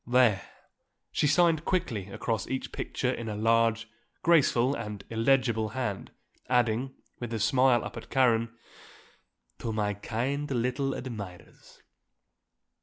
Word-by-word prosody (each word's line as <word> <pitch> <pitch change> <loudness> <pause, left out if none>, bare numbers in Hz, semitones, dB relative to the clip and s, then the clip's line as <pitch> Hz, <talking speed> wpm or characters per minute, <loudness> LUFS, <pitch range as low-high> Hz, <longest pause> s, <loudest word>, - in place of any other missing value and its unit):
There," 120 -5 +4 0.7
she 150 - +1
signed 165 +1 +3
quickly 140 - -1
across 110 +1 -3
each 130 0 -3
picture - - -2
in 115 -1 -4
a 105 - -3
large, 115 +1 +2 0.4
graceful 140 -6 +4
and 105 -6 -5
illegible 115 -1 +2
hand, 110 -7 -3 0.4
adding, 125 +1 +1 0.2
with 120 -2 -5
a - - -2
smile 125 +2 +3
up - - -7
at - - -9
Karen, 115 -3 +3 1.1
"To 115 - -3
my 105 -1 0
kind 125 +8 -3
little 130 +2 0
admirers." 105 -8 -9
120 Hz, 120 wpm, -29 LUFS, 110-130 Hz, 1.1 s, There